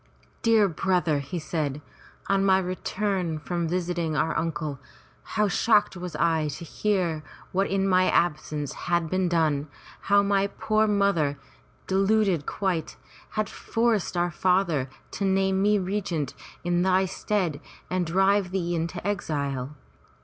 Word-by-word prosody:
"Dear 225 -3 +4
brother," 175 -3 +1
he 140 +6 -5
said, 155 -3 -2 0.5
"on 195 0 +2
my 190 -1 +5
return 185 -2 -2
from 170 +2 -2
visiting 175 -2 -1
our 155 +3 +1
uncle, 150 -3 -2 0.6
how 210 0 +4
shocked 205 +1 +3
was 180 -1 -6
I 160 -2 +2
to 150 +3 -6
hear 180 -4 0 0.3
what 195 +2 +1
in 195 0 +1
my 185 -1 +4
absence 150 -3 0 0.2
had 170 -2 +1
been 185 -1 +1
done, 155 -4 +1 0.4
how 200 0 +6
my 200 0 +2
poor 215 +2 +1
mother, 200 -9 +2 0.5
deluded 195 -4 +2
quite, 185 -5 -2 0.4
had 215 -1 +1
forced 225 -6 0
our 175 0 +1
father 170 -7 +1 0.2
to - - -4
name 190 0 +2
me 210 +1 +4
regent 180 -7 -2 0.3
in 175 0 +1
thy 190 +1 +3
stead 185 -4 -1 0.3
and 185 0 0
drive 190 +3 +2
thee 175 -2 -1
into 170 +2 -3
exile. 145 -8 -2
180 Hz, 135 wpm, -26 LUFS, 160-195 Hz, 0.6 s, how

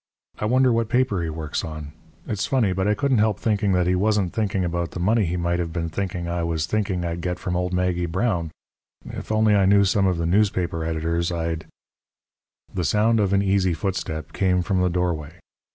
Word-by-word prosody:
I - - -1
wonder 130 +2 +3
what 115 -1 0
paper 125 -7 +1
he 85 - -2
works 80 -1 -3
on? 75 -2 -6 0.3
It's 105 -2 -2
funny, 115 -8 +2
but 95 +2 0
I 105 - +3
couldn't 130 +1 +1
help 105 -2 +2
thinking 105 -3 +1
that 90 -1 +2
he 90 - +2
wasn't 100 -1 +1
thinking 100 -4 0
about 85 0 -2
the - - -7
money 105 +4 +2
he 90 +2 -2
might 85 0 0
have 85 -2 -2
been 85 0 -3
thinking 90 0 -3
I 85 0 -2
was 85 -2 -1
thinking 95 -1 -1
I'd 85 0 -3
get 90 +1 -2
from 90 - -3
old 90 0 -1
Maggie 90 -1 0
Brown. 90 -2 -1 0.6
If - - -7
I - - +2
only 105 -3 +4
knew 100 0 +5
some 100 0 +2
of 90 -2 +1
the 85 - -1
newspaper 90 -3 +1
editors 80 +1 -1
I'd 80 -1 -3 0.5
" - - -38
The 90 - -1
sound 110 +5 +2
of 100 -2 +1
an 100 0 +3
easy 95 -3 +2
footstep 80 -4 -4
came 90 -2 +1
from 95 +1 0
the 90 - +2
doorway. 85 -4 -2
90 Hz, 215 wpm, -23 LUFS, 85-100 Hz, 0.6 s, knew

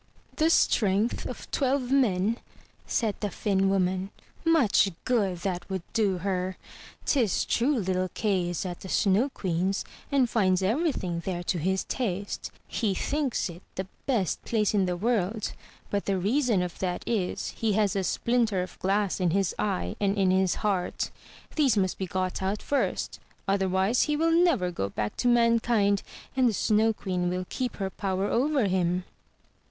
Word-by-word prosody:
'' - - -30
"The 315 0 +3
strength 210 -7 +2
of - - -8
twelve 265 -2 0
men!" 225 -4 +2 0.5
said 220 -3 +1
the 205 - -1
Finn 195 -1 +1
woman; 190 0 +1 0.3
"much 310 -12 +4 0.2
good 205 -8 +1
that 180 -2 -3
would 190 -3 -3
do 205 -5 +2
her! 185 0 -2 0.5
'Tis 235 - +2
true 270 +4 +2
little 185 -3 0
Kay 190 -5 +1
is 175 +2 -3
at 175 -1 -5
the 190 - -9
Snow 210 +8 +3
Queen's 190 -4 -1 0.3
and 270 -3 +4
finds 190 -5 +2
everything 210 - 0
there 175 -2 -3
to 175 - -1
his 190 +4 0
taste; 200 -5 -3 0.2
he 210 -5 -1
thinks 285 -2 -1
it 175 0 -9
the 190 - -3 0.2
best 225 - 0
place 215 -3 +1
in 195 -3 +2
the 180 -1 -1
world, 215 0 0 0.4
but 200 -1 -1
the 195 -1 +1
reason 220 0 +2
of 175 -1 -6
that 180 -2 -2
is, 205 -6 -1
he 220 -2 -1
has 205 -2 +2
a - - +2
splin 235 +5 +1
ter 190 -4 -1
of 180 - -10
glass 200 +1 +1
in 180 -2 +2
his 195 +1 +1
eye 90 -4 -1
and 200 0 +1
in 190 -2 +3
his 190 -1 +2
heart. 190 -4 0 0.4
These 275 -8 +3
must 190 -2 0
be 190 - -2
got 185 +1 -2
out 195 +2 -1
first; 285 - -1 0.3
otherwise, 195 +3 +2
he 300 - +2
will 325 +2 +2
never 325 - +3
go 100 - -2
back 105 +1 -3
to - - 0
mankind, 230 -4 +3 0.3
and 255 -2 +4
the - - -1
Snow 215 +2 +3
Queen 180 -4 -2
will 180 +1 -2
keep 255 -2 -3
her 195 -2 -3
power 195 -2 -1
over 265 +3 +2
him." 180 -1 +1
195 Hz, 170 wpm, -27 LUFS, 185-230 Hz, 0.5 s, much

